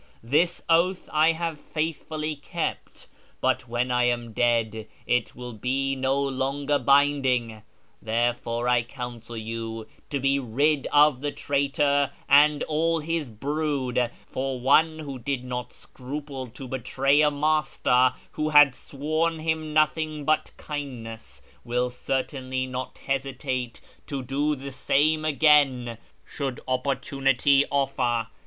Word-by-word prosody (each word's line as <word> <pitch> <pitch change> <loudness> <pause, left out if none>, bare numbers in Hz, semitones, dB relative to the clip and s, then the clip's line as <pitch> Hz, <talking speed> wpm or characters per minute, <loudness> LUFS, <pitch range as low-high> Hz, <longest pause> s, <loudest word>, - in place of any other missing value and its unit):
This 155 +9 +1
oath 175 +3 +2
I 155 +2 +4
have 165 -2 -3
faithfully 155 0 -3
kept; 145 - -5 0.3
but - - 0
when 120 +2 -1
I 125 0 +3
am 120 -2 -1
dead 110 -2 +1 0.2
it 120 - 0
will 125 -1 -7
be 135 +5 -1
no 135 +1 0
longer 140 +1 0
binding. 130 -4 +2 0.4
Therefore 120 +1 -1
I 125 -1 +4
counsel 120 -2 -8
you 115 0 -5 0.2
to 140 - -1
be 135 +1 +2
rid 140 +4 +1
of 145 -3 +5
the 145 0 -2
traitor 140 0 +1 0.2
and 145 +1 +5
all 165 +2 +1
his 160 -2 -2
brood, 135 0 -1 0.2
for 130 -1 -3
one 155 +5 +4
who 140 -4 -7
did 125 +1 -3
not 125 -1 -5
scruple 135 0 -7
to 125 +3 -10
betray 135 +3 +1
a 150 - +5
master 145 -4 +2 0.2
who 155 0 -2
had 145 -3 +7
shown 155 +5 -2
him 160 -1 -2
nothing 155 0 +1
but 155 +1 +1
kindness 125 -7 -7 0.2
will 125 +1 -1
certainly 130 0 -2
not 130 0 -6
hesitate 130 -2 -3 0.3
to 140 -2 -4
do 145 +4 0
the 140 0 -8
same 155 +4 +1
again 140 -6 +3 0.3
should 135 -4 -4
opportunity 135 +1 +2
offer. 125 -5 0
135 Hz, 125 wpm, -25 LUFS, 125-150 Hz, 0.4 s, had